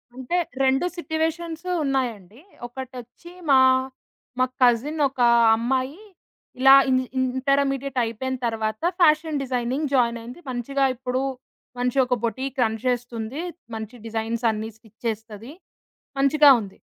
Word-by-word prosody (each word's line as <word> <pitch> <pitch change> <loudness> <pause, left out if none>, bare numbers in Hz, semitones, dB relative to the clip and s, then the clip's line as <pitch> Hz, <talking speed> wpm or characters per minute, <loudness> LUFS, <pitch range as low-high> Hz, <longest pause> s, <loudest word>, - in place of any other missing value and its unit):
అంటే 260 +7 -2 0.3
2 265 +4 +2
సిట్యుయేషన్స్ 325 0 -3 0.2
ఉన్నాయండి 240 -7 -2 0.3
ఒకటొచ్చి 255 +5 -10 0.2
మా, 270 - +7 0.8
మా 255 - +4 0.2
కజిన్ 250 +6 +3
ఒక 265 - -18 0.4
అమ్మాయి 260 - -1 0.6
ఇలా 270 +1 +8 0.2
ఇంజి 255 0 +2
ఇ - - +2 0.2
ఇంటర్మీడియేట్ 275 -1 0
అయిపోయిన 235 +3 -3
తరువాత 220 -1 -3 0.2
ఫ్యాషన్ 310 -2 +3
డిజైనింగ్ 255 +3 -2
జాయినయింది, 235 +1 0
మంచిగా 270 +3 -1
ఇప్పుడు 255 +1 -2 0.6
మంచి 250 +1 -1
ఒక 250 - -1
బొటీక్ 260 +3 -3
రన్ 220 -1 -1
చేస్తుంది. 245 +2 -2 0.3
మంచి 220 +2 -7
డిజైన్సన్ని 225 0 -2
స్టిచ్ 220 -1 -24
చేస్తది, 225 +2 -6 0.7
మంచిగా 285 +1 +6
ఉంది. 200 -3 -10
255 Hz, 115 wpm, -23 LUFS, 230-275 Hz, 0.8 s, ఇలా